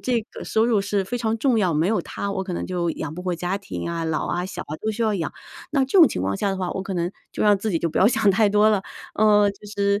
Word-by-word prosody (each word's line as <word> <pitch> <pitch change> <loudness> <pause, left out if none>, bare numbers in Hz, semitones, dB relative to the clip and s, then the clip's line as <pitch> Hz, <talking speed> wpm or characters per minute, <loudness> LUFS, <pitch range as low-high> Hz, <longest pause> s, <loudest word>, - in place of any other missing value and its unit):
这 245 -2 0
个 - - -8
收 220 - +2
入 230 -3 +2
是 200 0 0
非 245 +6 -3
常 225 -1 0
重 245 -1 +2
要， 180 -6 +1
没 160 +3 +2
有 220 - +1
它 200 - -5
我 190 -1 -2
可 185 - -5
能 - - -3
就 175 -2 -2
养 155 -2 -5
不 180 - -7
活 180 -1 -1
家 180 +3 -2
庭 200 - -6
啊， 165 -1 -3
老 160 -1 -1
啊、 180 +1 -2
小 - - -6
啊 155 - -7
都 220 - -3
需 225 +2 -2
要 220 -2 +2
养， 170 -5 -3 0.4
那 280 - +2
这 270 +9 +2
种 330 - +9
情 - - -3
况 100 +1 -1
下 200 - -1
的 195 - -1
话， 185 -1 -2
我 - - -3
可 195 0 -5
能 175 0 -1 0.2
就 - - -2
让 205 -1 +4
自 215 +1 -2
己 165 - +1
就 170 - 0
不 - - -1
要 190 - +6
想 210 -2 +3
太 210 +2 +3
多 210 +1 +4
了。 205 -3 +1 0.3
呃， 210 -1 +4
就 200 +1 -14
是 200 -1 0
200 Hz, 330 characters per minute, -23 LUFS, 180-215 Hz, 0.4 s, 种